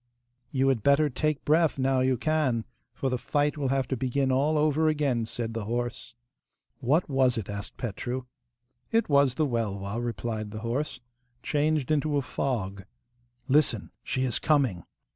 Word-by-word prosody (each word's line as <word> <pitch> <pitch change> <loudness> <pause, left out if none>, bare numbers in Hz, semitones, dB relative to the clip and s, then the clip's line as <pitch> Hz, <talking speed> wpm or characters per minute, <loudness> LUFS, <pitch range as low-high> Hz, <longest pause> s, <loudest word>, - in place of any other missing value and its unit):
'You 135 -3 +1
had 130 -5 +1
better 140 +4 +4
take 155 +3 -1
breath 160 0 +3
now 130 0 +2
you 130 0 +2
can, 135 -5 +1 0.3
for 135 - -3
the 125 - -1
fight 145 +2 0
will 145 -3 -1
have 135 -1 +1
to 130 - 0
begin 130 +2 0
all 145 +4 +2
over 155 +1 +3
again,' 140 -7 +1
said 115 0 -4
the 115 -2 -3
horse. 120 0 -3 0.6
'What 140 +7 +2
was 130 -4 +2
it?' 105 -2 -4
asked 100 0 -7
Petru. 120 +2 -4 0.7
'It 225 -1 +2
was 140 -3 +4
the 155 - +2
Welwa,' 110 -3 -2
replied 110 -1 -3
the 110 +1 -7
horse, 125 +7 -2 0.4
'changed 150 -2 +1
into 150 -1 +1
a 140 - 0
fog 100 -8 -2 0.6
'Listen! 135 -6 +2
She 130 - -1
is 125 -3 0
coming! 130 - +1
130 Hz, 160 wpm, -28 LUFS, 115-145 Hz, 0.7 s, better